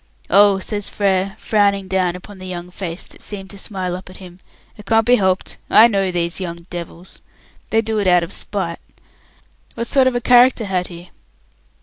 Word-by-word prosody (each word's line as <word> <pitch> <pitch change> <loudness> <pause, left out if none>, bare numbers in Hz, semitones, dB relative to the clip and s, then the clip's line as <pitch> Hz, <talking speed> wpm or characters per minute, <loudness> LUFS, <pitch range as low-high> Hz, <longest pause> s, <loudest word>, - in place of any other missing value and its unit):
"Oh," 200 0 +6
says 205 +1 -3
Frere, 195 -1 0
frowning 200 -3 +1
down 185 -2 0
upon 190 +2 -11
the 185 - -8
young 180 -1 -7
face 175 -2 -5
that - - -16
seemed 195 -2 -7
to 200 - -11
smile 185 -3 -4
up 185 0 -9
at 185 - -12
him. 180 -1 -13 0.4
"It 210 -2 -14
can't 225 -1 +3
be 245 +1 +5
helped. 190 -1 0
I 225 - +8
know 195 -4 0
those 170 0 -2
young 170 -2 -6
devils. 175 +1 -8 0.5
They'd 225 0 +1
do 220 -1 -1
it 200 - 0
out 180 -1 +5
of 170 - -7
spite. 180 -5 -4 1.0
What 235 - -3
sort 260 +2 +3
of 255 - +1
a - - +1
character 245 -1 +5
had 185 -2 -1
he?" 175 0 -12
190 Hz, 195 wpm, -19 LUFS, 180-210 Hz, 1.0 s, I